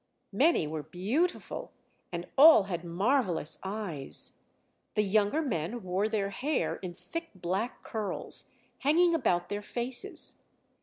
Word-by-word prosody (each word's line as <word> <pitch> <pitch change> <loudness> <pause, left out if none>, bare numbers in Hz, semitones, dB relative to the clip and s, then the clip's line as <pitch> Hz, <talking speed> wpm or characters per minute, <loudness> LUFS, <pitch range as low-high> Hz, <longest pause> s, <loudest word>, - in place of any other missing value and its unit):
Many 275 - +4
were 155 0 -3
beautiful, 205 - -2 0.4
and 170 0 -4
all 290 -5 +9
had 180 -3 -4
marvellous 185 - 0
eyes; 190 -8 -4 0.6
the 210 - +3
younger 210 +9 +2
men 215 - -2
wore 185 +4 0
their 200 -3 0
hair 275 +9 -1
in 180 -2 -7
thick 330 - -6
black 190 +6 -2
curls, 215 -3 -4 0.3
hanging 335 +5 +4
about 180 - +1
their 205 0 -2
faces. 250 - -3
205 Hz, 120 wpm, -30 LUFS, 180-265 Hz, 0.6 s, all